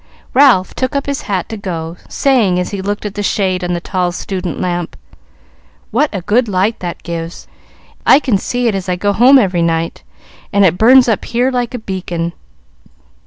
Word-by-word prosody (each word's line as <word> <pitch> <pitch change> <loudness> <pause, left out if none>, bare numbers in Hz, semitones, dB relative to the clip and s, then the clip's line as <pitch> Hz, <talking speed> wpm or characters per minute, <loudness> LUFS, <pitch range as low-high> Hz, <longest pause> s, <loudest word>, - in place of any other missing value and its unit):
Ralph 250 -9 +4
took 260 +2 -2
up 280 - -1
his 280 0 -3
hat 190 -3 -1
to 220 - -5
go, 170 -4 -5
saying 235 -10 +2
as 180 - -2
he 200 -2 -4
looked 205 +2 -3
at 205 - -4
the 205 - -4
shade 190 -2 0
on 175 0 -1
the 175 - -1
tall 180 0 -1
student 180 -1 -4
lamp, 175 -2 -3 0.9
"What 280 +7 +2
a 195 - -4
good 235 +6 +2
light 200 +3 0
that 175 -1 -6
gives! 165 0 -6 0.6
I - - +7
can 240 -9 0
see 245 +3 -1
it 225 - +1
as 190 -1 -4
I 180 - +1
go 200 +3 0
home 255 +6 +6
every 185 -8 +2
night, 165 0 -1 0.5
and 200 -2 +4
it 180 0 +2
burns 250 +3 +6
up 220 -4 0
here 245 +2 0
like 245 -1 -2
a - - -2
beacon. 175 -5 -4
195 Hz, 195 wpm, -15 LUFS, 180-240 Hz, 0.9 s, I